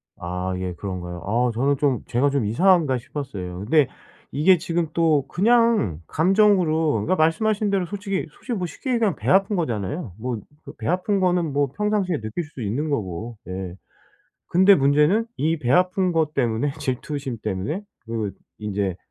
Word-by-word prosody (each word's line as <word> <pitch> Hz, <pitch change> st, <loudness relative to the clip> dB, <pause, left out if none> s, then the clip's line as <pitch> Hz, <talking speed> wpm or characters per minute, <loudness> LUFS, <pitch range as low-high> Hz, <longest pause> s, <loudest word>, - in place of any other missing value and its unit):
아 90 Hz, +2 st, -4 dB
예. 90 Hz, -1 st, -3 dB
그런가요? 90 Hz, -2 st, -6 dB
아 120 Hz, +4 st, +1 dB
저는 135 Hz, +4 st, +1 dB
좀 135 Hz, -5 st, +1 dB
제가 135 Hz, +4 st, +2 dB
좀 135 Hz, -6 st, 0 dB
이상한가 155 Hz, -, +3 dB
싶었어요. 100 Hz, -9 st, -6 dB
근데 135 Hz, +7 st, +3 dB, 0.4 s
이게 165 Hz, +7 st, +4 dB
지금 170 Hz, -1 st, -1 dB
또 155 Hz, -5 st, +2 dB
그냥 220 Hz, -, +2 dB
감정으로 175 Hz, -4 st, +3 dB
그러니까 115 Hz, -, +1 dB
말씀하신 205 Hz, +6 st, +2 dB
대로 195 Hz, -3 st, +1 dB
솔직히 195 Hz, 0 st, -3 dB
솔직히 245 Hz, -, -6 dB
뭐 180 Hz, -, -2 dB
쉽게 260 Hz, -, -4 dB
얘기하면 225 Hz, -5 st, +2 dB
배 -, -, -4 dB
아픈 195 Hz, +2 st, +4 dB
거잖아요? 120 Hz, -, -3 dB
뭐 120 Hz, 0 st, -3 dB, 0.3 s
그 -, -, -9 dB
배 -, -, -5 dB
아픈 185 Hz, +3 st, +1 dB
거는 175 Hz, -5 st, +1 dB
뭐 145 Hz, 0 st, +2 dB
평상시에 200 Hz, -3 st, 0 dB
느낄 110 Hz, +11 st, -4 dB
수도 145 Hz, -4 st, -10 dB
있는 120 Hz, +9 st, -2 dB
거고 110 Hz, -, -3 dB
예. 90 Hz, -1 st, -5 dB, 0.7 s
근데 190 Hz, +3 st, +6 dB
문제는 150 Hz, +9 st, +3 dB
이 160 Hz, +3 st, 0 dB
배 125 Hz, -4 st, -2 dB
아픈 180 Hz, +2 st, +3 dB
것 155 Hz, -2 st, 0 dB
때문에 130 Hz, +2 st, 0 dB
질투심 135 Hz, -2 st, -3 dB
때문에 105 Hz, -, -3 dB, 0.2 s
그 110 Hz, -3 st, -3 dB, 0.3 s
인제 100 Hz, -3 st, -2 dB
145 Hz, 335 characters per minute, -23 LUFS, 110-185 Hz, 0.7 s, 근데